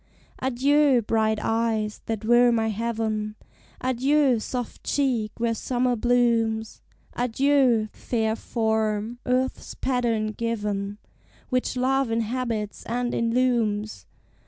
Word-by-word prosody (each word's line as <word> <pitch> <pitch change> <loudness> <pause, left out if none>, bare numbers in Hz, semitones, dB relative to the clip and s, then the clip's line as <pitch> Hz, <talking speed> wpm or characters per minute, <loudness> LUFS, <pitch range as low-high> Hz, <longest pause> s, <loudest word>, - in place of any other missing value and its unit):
Adieu, 270 +1 +3
bright 220 0 +1
eyes, 225 -2 -1
that 220 -1 -3
were 240 +1 +5
my 225 -1 +1
heaven! 220 -1 -2 0.5
Adieu, 260 0 +2
soft 245 +2 -5
cheek, 245 -7 0
where 230 0 +1
summer 245 +2 0
blooms! 230 -2 +1 0.3
Adieu, 250 -2 +2
fair 220 -2 -1
form, 220 0 -1
earth's 255 +1 -1
pattern 235 -4 0
given, 210 -3 -3 0.5
Which 255 0 -1
Love 265 0 +1
inhabits 225 -2 -2
and 240 +1 -1
illumes! 230 -3 0
230 Hz, 100 wpm, -25 LUFS, 220-250 Hz, 0.5 s, were